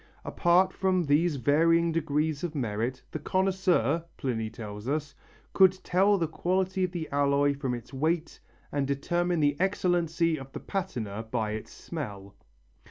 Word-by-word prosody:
Apart 185 +2 +3
from 185 -2 +1
these 155 +2 +2
varying 165 +6 +3
degrees 155 -1 -1
of 165 -3 -3
merit, 120 0 -2
the 155 - -4
connoisseur, 185 - +1
Pliny 115 -4 -2
tells 105 -1 -8
us, 150 0 -2 0.4
could 190 -2 +6
tell 195 +3 +3
the 165 -3 0
quality 185 +4 0
of 180 - 0
the 170 -3 -4
alloy 140 0 +3
from 135 -3 -2
its 120 +3 -10
weight 160 +4 -1 0.3
and 140 -2 0
determine 175 +5 0
the 145 -1 +3
excellency 170 -4 +1
of 135 0 -10
the - - -5
patina 120 - -4
by 110 -3 -1
its 110 0 -6
smell. 100 - -7
155 Hz, 150 wpm, -28 LUFS, 135-175 Hz, 0.4 s, could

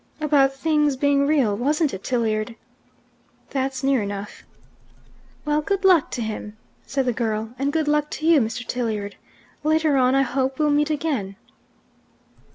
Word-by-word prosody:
"About 290 -3 +3
things 300 -1 +1
being 280 0 +2
real, 270 -9 +2
wasn't 290 +5 0
it, 190 - -7
Tilliard?" 225 -2 -1 1.0
"That's 265 -1 -2
near 270 -3 +2
enough." 200 0 -6 1.0
"Well, 300 0 +1
good 395 +4 -2
luck 360 -5 +5
to 240 - -2
him!" 215 -1 -6 0.3
said 270 -1 -1
the 245 - +1
girl. 220 -1 -2
"And 280 +1 0
good 315 -1 0
luck 300 0 +1
to 310 - -5
you, 325 -2 +6
Mr. 230 +2 -3
Tilliard! 215 -5 -3 0.5
Later 310 -1 +2
on, 255 0 +3
I 270 - +4
hope, 265 0 -1
we'll 300 -1 +2
meet 295 +1 +2
again." 280 -11 -2
270 Hz, 155 wpm, -23 LUFS, 230-300 Hz, 1.0 s, you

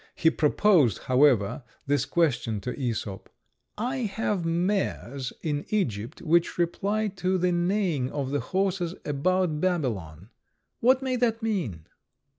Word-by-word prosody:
He 160 - +3
proposed, 150 - +3
however, 130 -5 +3 0.2
this 140 -2 +1
question 120 -10 0
to 125 - -4
Æsop: 115 -7 -4 0.5
"I 250 +5 -2
have 210 -5 -1
mares 165 - -1
in 150 -2 -1
Egypt 120 - -2
which 170 +1 +2
reply 200 +5 0
to 185 +1 +1
the 180 0 +1
neighings 175 -6 0
of 140 -2 -3
the 145 - +1
horses 185 -1 -1
about 155 +2 0
Babylon. 110 - -2 0.5
What 260 +3 +4
may 255 -1 0
that 230 -2 0
mean?" 160 - -2
170 Hz, 125 wpm, -27 LUFS, 130-195 Hz, 0.5 s, What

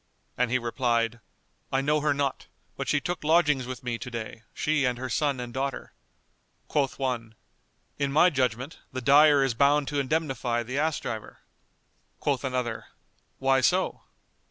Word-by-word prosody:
And 125 -1 +1
he 130 - +2
replied, 115 -1 0 0.5
"I 135 - +2
know 150 +2 +2
her 150 0 +1
not; 140 -1 -1 0.3
but - - -4
she 145 - +2
took 175 +2 -4
lodgings 150 -5 +3
with 130 0 -6
me 120 -2 -3
to - - -6
day, 115 -1 -6
she 150 -1 0
and 125 -2 +1
her 130 +1 -4
son 140 +2 0
and 120 -1 -6
daughter." 135 0 -3 0.7
Quoth 140 -3 0
one, 120 -4 -3 0.6
"In 140 -1 0
my 175 +5 +5
judgment, 130 +1 -1
the 130 - -4
dyer 145 +2 +6
is 135 -3 +1
bound 140 +3 +3
to 145 - -1
indemnify 135 -5 -1
the 130 +4 -3
ass 155 -1 +1
driver." 110 -2 -6 0.8
Quoth 140 -2 0
another, 125 -3 -2 0.5
"Why 135 0 +3
so?" 185 +8 +1
135 Hz, 160 wpm, -27 LUFS, 125-145 Hz, 0.8 s, dyer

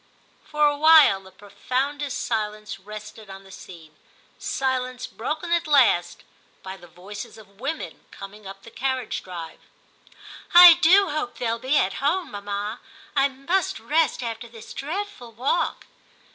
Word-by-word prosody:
For 300 0 +1
a 290 0 +3
while 310 -11 +6
the 190 - -15
profoundest 270 +8 -3
silence 215 -2 -3
rested 210 +1 -11
on 195 0 -10
the 190 - -16
scene 165 -5 -13 0.3
— - - -36 0.2
silence 255 -1 -2
broken 310 +9 -5
at 340 -1 +1
last 225 - +3 0.4
by 190 0 -7
the 175 -2 -15
voices 195 +6 -10
of 200 -2 -18
women 285 +6 -5
coming 195 +1 -11
up 195 0 -11
the 230 - -13
carriage 260 0 -3
drive. 170 -3 -9 0.5
* - - -17
I 350 -1 +12
do 350 +3 +4
hope 300 -5 -4
they'll 230 -1 -2
be 265 +5 +1
at 195 +1 0
home, 320 +1 0
mamma; 205 +2 -5 0.4
I 275 0 +4
must 360 +8 -2
rest 310 -5 0
after 230 0 -5
this 230 -1 -12
dreadful 310 - -6
walk. 255 +9 -1
245 Hz, 150 wpm, -24 LUFS, 205-295 Hz, 0.5 s, I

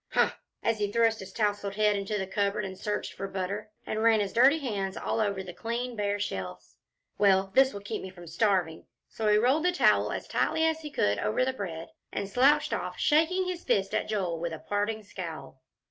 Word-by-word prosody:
"Humph!" - - +3 0.3
as 225 -1 +1
he 205 -1 0
thrust 225 0 +2
his 190 0 -9
tousled 205 -1 -1
head 210 0 +3
into 200 +1 -2
the 190 - -2
cupboard, 200 +1 -1
and 190 -1 -6
searched 205 +2 -3
for 195 - -5
butter, 195 +3 -4 0.2
and 215 - -2
ran 225 -1 +5
his 200 -2 -2
dirty 265 +6 +6
hands 205 -9 -3
all - - -2
over 200 -3 0
the 180 -2 -8
clean, 235 +5 -3
bare 205 -1 -1
shelves 90 - -5 0.4
"well, 195 -1 +4
this 265 +2 +5
will 200 - -7
keep 210 +2 -4
me 190 - -7
from 175 -2 -12
starving." 185 -4 0 0.2
So 220 - -3
he 210 0 +5
rolled 260 +8 +3
the 360 - +3
towel 360 - +3
as - - -5
tightly 320 - +1
as 320 0 +1
he 305 -2 -7
could 100 - +1
over 105 - +1
the 260 - -1
bread, 170 -8 -6 0.2
and 200 - -3
slouched 275 +8 +3
off, - - -3
shaking 325 +5 +3
his 360 -1 -4
fist 195 0 +1
at - - 0
Joel 185 -6 -1
with 170 0 -3
a 160 - -6
parting 210 +2 -1
scowl. 165 -8 -8
205 Hz, 215 wpm, -28 LUFS, 190-230 Hz, 0.4 s, dirty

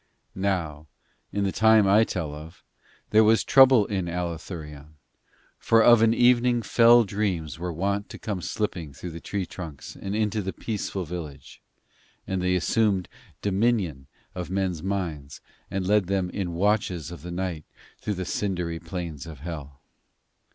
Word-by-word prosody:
Now 85 -6 -2 0.4
in 100 - -1
the 95 - 0
time 110 -1 +5
I 105 +3 +6
tell 85 -9 -3
of, 80 +3 -11 0.5
there 110 +1 +6
was 110 +1 +4
trouble 130 -5 +6
in 95 -4 -2
Allathurion, 80 -3 -6 0.6
for 115 0 +4
of 120 -1 +7
an 115 0 +5
evening 120 0 +3
fell 120 +1 +6
dreams 95 -7 -2
were 90 +1 -3
wont 100 +5 -2
to - - -8
come 100 -4 -4
slipping 85 -7 -3
through 85 +6 -7
the 85 - -7
tree 100 +2 -3
trunks 80 -7 -9
and 100 +1 -5
into 110 0 0
the 95 0 -4
peaceful 100 -4 -4
village; 75 -5 -8 0.6
and 95 -1 -2
they 90 0 +1
assumed 95 0 +1 0.3
dominion 95 - 0 0.3
of 90 -1 -5
men's 95 -3 -1
minds 85 -7 -4 0.3
and 95 -1 -2
led 105 -1 +3
them 95 -2 -1
in 90 -4 -3
watches 95 -4 0
of 85 -5 -9
the 90 - -8
night 85 -3 -4 0.3
through 105 - -3
the 95 0 -4
cindery 90 -5 -2
plains 85 -3 -6
of 75 -5 -10
Hell. 75 -4 -7
95 Hz, 155 wpm, -26 LUFS, 85-105 Hz, 0.6 s, of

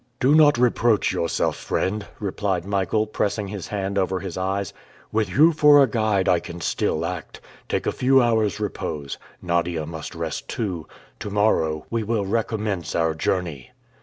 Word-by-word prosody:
"Do 135 +3 +4
not 150 -3 +6
reproach 120 -3 +2
yourself, 85 -3 0
friend," 100 +2 -2
replied 95 -3 -2
Michael, 100 +2 0
pressing 105 -1 -2
his 100 -3 -6
hand 100 -1 -2
over 95 0 0
his 95 -3 -6
eyes. 95 0 -2 0.4
"With 110 -3 0
you 155 - +5
for 150 -2 +6
a - - +6
guide 110 -4 +1
I 90 -2 +4
can 85 0 -8
still 80 0 -1
act. 90 -2 -6 0.3
Take - - -1
a - - +1
few 135 +1 +3
hours' 110 -4 +2
repose. 80 -9 -4 0.2
Nadia 85 -2 0
must 80 +2 -7
rest 80 -3 -4
too. 90 -8 -3 0.3
To - - -5
morrow 90 -7 +1
we 115 -1 0
will 110 -1 -1
recommence 105 -3 -2
our 80 -1 +2
journey!" 80 -4 -2
100 Hz, 165 wpm, -23 LUFS, 85-110 Hz, 0.4 s, not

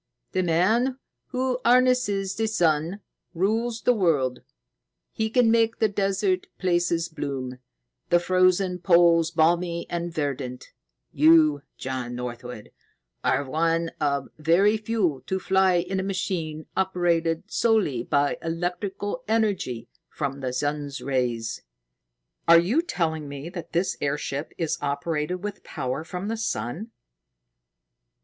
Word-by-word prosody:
"The 185 - +1
man 215 +10 +2 0.3
who 255 -1 -1
harnesses 240 -6 +3
the 220 +2 -1
sun 170 -1 +1 0.3
rules 225 +6 0
the 250 - +4
world. 150 - +1 0.7
He 220 0 -1
can 240 -1 +4
make 230 0 +3
the 220 - +3
desert 195 -2 0
places 175 -2 +1
bloom, 135 -5 -5 0.5
the 175 - +5
frozen 185 +1 +2
poles 170 -2 +5
balmy 170 +1 +1
and 170 0 -2
verdant. 140 -5 -4 0.4
You, 155 -1 +5 0.2
John 130 -2 -4
Northwood, 125 -2 -7 0.5
are 140 - +1
one 165 +4 0
of 140 -2 0
the - - -16
very 185 +7 +4
few 210 - -1
to 190 - 0
fly 190 0 +3
in 190 +2 0
a - - -1
machine 175 -5 -3
operated 170 -3 +1
solely 215 - +1
by 145 +3 +1
electrical 185 +7 -3
energy 200 - 0 0.2
from 140 -1 -4
the 130 -2 -3
sun's 145 0 -2
rays." 125 -4 -1 0.9
"Are 170 0 +9
you 215 - +2
telling 160 - -2
me 140 +3 -6
that 175 -2 -8
this 175 +3 0
airship 145 +1 -2
is 165 -3 -1
operated 150 +5 -2
with 205 -1 -5
power 130 +4 -4
from 180 +4 -5
the 225 +1 -2
sun?" 170 - -3
170 Hz, 125 wpm, -25 LUFS, 145-195 Hz, 0.9 s, Are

